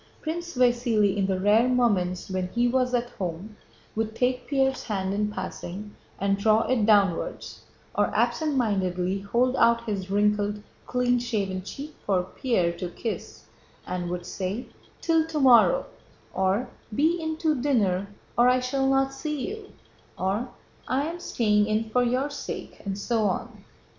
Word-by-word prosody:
Prince 340 +1 -4
Vasíli, 240 -5 +3
in 195 -1 +1
the 190 -1 0
rare 210 +5 +4
moments 200 -8 +1
when 185 -1 -1
he 240 +1 +3
was 250 0 +1
at 240 0 -1
home, 185 +2 -5 0.4
would 220 0 -2
take 250 +1 0
Pierre's 265 -2 +1
hand 195 -4 -2
in 210 +1 0
passing 195 +1 -6 0.2
and 195 0 0
draw 220 +2 +4
it 235 -5 +2
downwards, 200 -5 +1 0.3
or - - +2
absent 310 -3 0
mindedly 190 -5 0
hold 240 +6 +1
out 235 0 +4
his 200 -4 -3
wrinkled, 205 0 +1 0.2
clean 245 0 +2
shaven 200 -6 -2
cheek 285 +10 -8
for 190 -3 +1
Pierre 185 -3 0
to 180 - -3
kiss 225 +5 -6 0.4
and 180 -1 -3
would 175 0 -4
say: 195 +6 -4 0.4
"Till 325 -1 +2
tomorrow," 290 - +5 0.5
or, 190 +5 +1 0.3
"Be 325 +6 +2
in 315 0 -2
to 310 -5 0
dinner 200 -9 +1 0.3
or 240 +1 +5
I 255 0 +4
shall 270 +2 0
not 270 0 +2
see 300 +1 -3
you," 430 -1 -8 0.5
or, 200 +7 -1 0.4
"I 270 +3 +1
am 335 +2 -5
staying 210 -9 +2
in 220 +1 -1
for 250 - +3
your 255 +4 0
sake," - - -7
and 195 -1 -3
so 220 +1 0
on. 190 - -3
225 Hz, 155 wpm, -26 LUFS, 195-255 Hz, 0.5 s, tomorrow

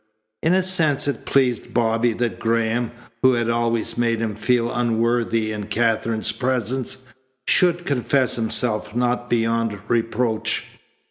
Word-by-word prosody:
In 165 +3 +3
a 190 - +2
sense 160 -7 +2
it 140 - -3
pleased 130 -4 +1
Bobby 115 0 +2
that 120 0 -2
Graham, 115 +1 0 0.3
who 130 0 +5
had 120 -1 0
always 115 0 0
made 115 -1 +1
him 110 -2 -2
feel 120 +2 0
unworthy 115 -1 0
in 105 -1 -5
Katherine's 110 0 +1
presence, 125 +1 -2 0.5
should 175 -1 +3
confess 135 -2 +1
himself 110 -1 0
not 125 0 0
beyond 115 -2 0
reproach. 115 0 0
115 Hz, 130 wpm, -22 LUFS, 115-125 Hz, 0.5 s, who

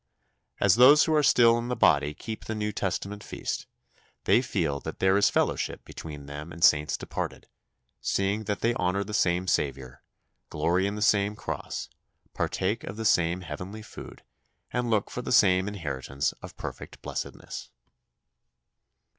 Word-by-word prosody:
As 100 +1 +4
those 140 +5 +8
who 160 - +1
are 155 - +4
still 120 -4 +5
in 120 - -4
the 125 - -1
body 75 -9 +3
keep 110 -1 -7
the 110 - -3
New 105 0 -2
Testament 100 +1 -3
feast, - - -4 0.6
they 120 - +4
feel 85 - -1
that - - -7
there 95 0 +3
is 100 - +4
fellowship - - -1
between 75 -3 -9
them 75 +3 -7
and 85 +1 -6
saints 75 0 +4
departed, - - -5 0.5
seeing 100 +3 0
that 105 0 -2
they 115 +1 +2
honour 95 -1 0
the 105 +1 -8
same 90 -3 +2
Saviour, 70 -6 -2 0.5
glory 85 +5 +1
in 100 - -3
the 105 - -1
same 100 0 +3
cross, - - -5 0.5
partake 100 +4 -1
of 100 - -7
the 110 - -4
same 90 -2 +2
heavenly 90 +6 -7
food, - - -11 0.5
and 125 -1 0
look 105 -3 +1
for 125 - -4
the - - -5
same 95 -5 +5
inheritance 70 -8 -2
of - - -10
perfect - - -8
blessedness. - - -6
100 Hz, 160 wpm, -27 LUFS, 85-110 Hz, 0.6 s, those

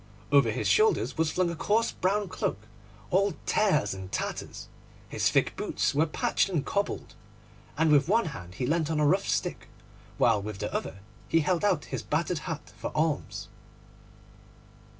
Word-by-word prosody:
Over 140 -5 +5
his 115 +3 -1
shoulders 435 0 +3
was 160 -1 +1
flung 175 +1 0
a - - -5
coarse 215 +7 +1
brown 200 +2 0
cloak, 100 - -3 0.5
all 200 +2 +2
tears 195 - +2
and 95 0 -8
tatters; - - -4 0.4
his - - +1
thick - - +1
boots - - -1
were 155 +3 +2
patched 155 - +1
and 160 -7 -1
cobbled, 200 0 -2 0.6
and 160 0 +3
with 145 0 +5
one 225 +4 +3
hand 90 -1 -9
he 125 - -2
leant 160 +2 +1
on 160 -2 0
a 150 - +3
rough 190 +7 +2
stick, - - -1 0.5
while 115 -4 +3
with 105 0 -6
the - - -4
other 100 - -4 0.3
he 165 - +4
held 175 +3 0
out 190 -7 +2
his - - -1
battered 165 +2 -1
hat 160 -2 -6
for - - -4
alms. 155 -1 -1
160 Hz, 170 wpm, -28 LUFS, 140-185 Hz, 0.6 s, Over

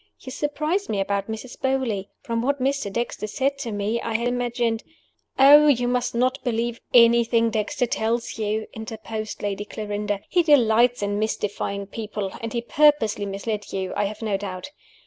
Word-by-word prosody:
You 260 - -9
surprise 305 +8 -1
me 205 - -1
about 200 0 -1
Mrs. 220 +3 -7
Beauly. 260 -7 0 0.2
From 230 0 -1
what 280 +3 0
Mr. 270 -5 -1
Dexter 235 -1 -3
said 275 +5 -1
to 240 -5 -4
me, 210 +3 -1
I 225 - -3
had 235 +2 +1
imagined 240 -2 -1 0.3
" - - -45
"Oh, 290 +3 +8
you 245 -4 +3
must 245 -1 0
not 255 +3 +1
believe 235 -1 -2
anything 235 -1 +5
Dexter 240 +5 0
tells 230 0 -2
you!" 215 0 -1
interposed 220 -1 -6
Lady 205 0 -2
Clarinda. 205 -1 -3
"He 360 - +3
delights 245 -6 +4
in 205 0 -1
mystifying 205 -2 -2
people; 210 -1 -5
and 230 0 -4
he 235 - -1
purposely 235 -7 +3
misled 205 +2 -4
you, 190 -1 -3
I 205 - +1
have 210 +3 -5
no 210 -3 0
doubt. 195 +5 -6
230 Hz, 170 wpm, -24 LUFS, 210-250 Hz, 0.3 s, Oh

